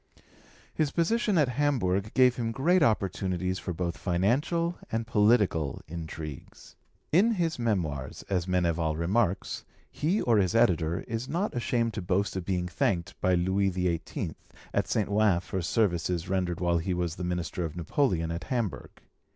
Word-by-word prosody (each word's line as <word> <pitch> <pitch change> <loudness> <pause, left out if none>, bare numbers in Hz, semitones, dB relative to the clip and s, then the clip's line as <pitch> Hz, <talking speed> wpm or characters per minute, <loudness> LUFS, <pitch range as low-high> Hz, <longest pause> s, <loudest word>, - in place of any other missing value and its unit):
His 155 -2 +1
position 195 +6 +1
at 150 -4 +4
Hamburg 110 -8 0
gave 125 -1 +5
him 115 -2 -1
great 170 +9 +2
opportunities 95 - 0
for 90 - -4
both 85 0 -3
financial 135 - 0
and 115 0 -1
political 105 - +2
intrigues. 80 -3 -8 0.4
In 210 +9 +4
his 170 - -1
Memoirs, 85 - -2
as 90 -2 -1
Meneval 85 -3 +1
remarks, 95 +3 0 0.3
he 175 +8 0
or 115 -3 +3
his 95 +2 +1
editor 85 -8 +2
is 115 +3 -5
not 185 +6 -1
ashamed 120 -1 0
to 105 - -4
boast 95 +3 0
of 95 -2 -3
being 90 -2 -1
thanked 85 0 -1
by 90 0 +3
Louis 95 +3 +2
XVIII. 90 -3 -2 0.4
at - - +1
St. 105 - 0
Ouen 105 -3 +3
for 95 +1 -4
services 90 -3 0
rendered 90 -3 -1
while 85 -1 +2
he 90 +2 -1
was 85 -1 -2
the 90 - -4
minister 90 0 -2
of 80 -3 -4
Napoleon 85 - 0
at 85 0 -4
Hamburg. 115 -8 -2
95 Hz, 155 wpm, -28 LUFS, 85-120 Hz, 0.4 s, gave